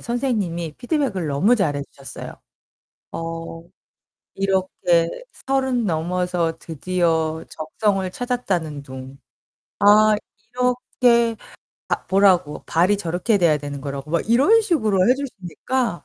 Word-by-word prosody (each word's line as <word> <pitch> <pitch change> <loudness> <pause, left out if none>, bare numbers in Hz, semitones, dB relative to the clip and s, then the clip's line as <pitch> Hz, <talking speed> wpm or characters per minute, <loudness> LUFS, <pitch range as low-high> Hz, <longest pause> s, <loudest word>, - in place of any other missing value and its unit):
선생님이 205 - -2
피드백을 245 - -1
너무 180 - +3
잘해 145 -10 0
주셨어요. 135 -1 -9 0.8
어 165 0 -6 0.7
이렇게 185 -3 +1 0.4
30 265 -3 +1
넘어서 175 -1 -1
드디어 160 -1 -1
적성을 190 +4 -1
찾았다는 185 - -2
둥. 130 0 -10 0.6
아, 210 +1 +6 0.4
이렇게 245 -2 +2 0.5
아, - - -2
보라고 185 -6 +3
발이 180 +5 +3
저렇게 180 +3 0
돼야 165 -5 +3
되는 145 -1 -6
거라고 140 +1 -6
막 170 - +2
이런 280 - +5
식으로 220 - +2
해 250 - +6
주시니까 240 - -3
185 Hz, 245 characters per minute, -22 LUFS, 165-235 Hz, 0.8 s, 아